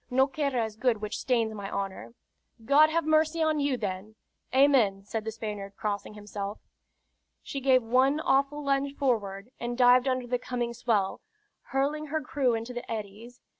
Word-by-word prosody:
No 265 +2 +4
querra 275 -5 -1
is 215 -1 -8
good 240 -2 +1
which 210 0 -4
stains 230 -4 +1
my 200 -2 -6
honor." 195 +4 -5 0.5
"God 295 +5 +6
have 330 +1 0
mercy 315 +1 +2
on 310 -1 +1
you, 280 -3 +1
then!" 205 0 -5 0.4
"Amen!" 255 -8 +4
said 220 +1 -4
the 220 - -2
Spaniard, 210 -3 -6
crossing 210 0 -4
himself. 205 0 -6 0.9
She 275 - -5
gave 260 -2 +4
one 260 +5 +3
awful 280 0 +1
lunge 275 0 0
forward, 220 -5 -1
and 240 0 -4
dived 250 +1 +5
under 255 -1 0
the 245 0 -1
coming 240 -1 -3
swell, 220 -5 0 0.4
hurling 290 +3 -1
her 315 +2 -1
crew 265 -4 0
into 230 +2 -5
the 245 -1 -7
eddies. 220 +3 -7
245 Hz, 170 wpm, -28 LUFS, 215-275 Hz, 0.9 s, God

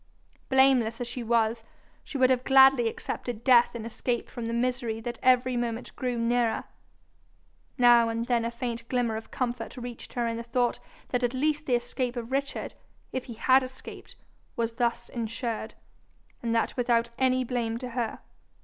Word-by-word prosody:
Blameless 265 -4 +4
as 245 - -2
she 245 +1 -5
was, 230 -1 +1 0.4
she 280 - -6
would 260 -1 +4
have 255 -1 +2
gladly 265 -2 +6
accepted 235 0 -5
death 245 -2 +5
in 225 -1 -5
escape 235 +1 -3
from 235 -2 -5
the - - -2
misery 240 -2 -1
that 240 +1 -6
every 255 0 +3
moment 240 0 -3
grew 250 -2 -2
nearer. 235 0 +1 1.1
Now 240 -2 +6
and 230 +1 -2
then 240 -2 +1
a 230 - -1
faint 235 0 -5
glimmer 245 -3 0
of 220 0 -7
comfort 245 -1 -3
reached 245 -1 -8
her 240 -1 -1
in 230 0 -2
the - - -4
thought 240 +1 0 0.3
that 245 - 0
at 245 +1 0
least 300 +3 0
the 250 - +3
escape 245 +1 -2
of 240 0 -5
Richard, 275 +1 -2 0.4
if 260 -1 -3
he 235 - -8
had 260 +4 +4
escaped, 260 0 -10 0.4
was 230 -1 -1
thus 235 -1 0
ensured, 230 -1 -4 0.7
and 230 -1 -1
that 230 - 0
without 235 -1 +1
any 255 -1 +3
blame 235 -2 -2
to 250 +1 -6
her. 235 -2 -3
240 Hz, 175 wpm, -28 LUFS, 230-255 Hz, 1.1 s, gladly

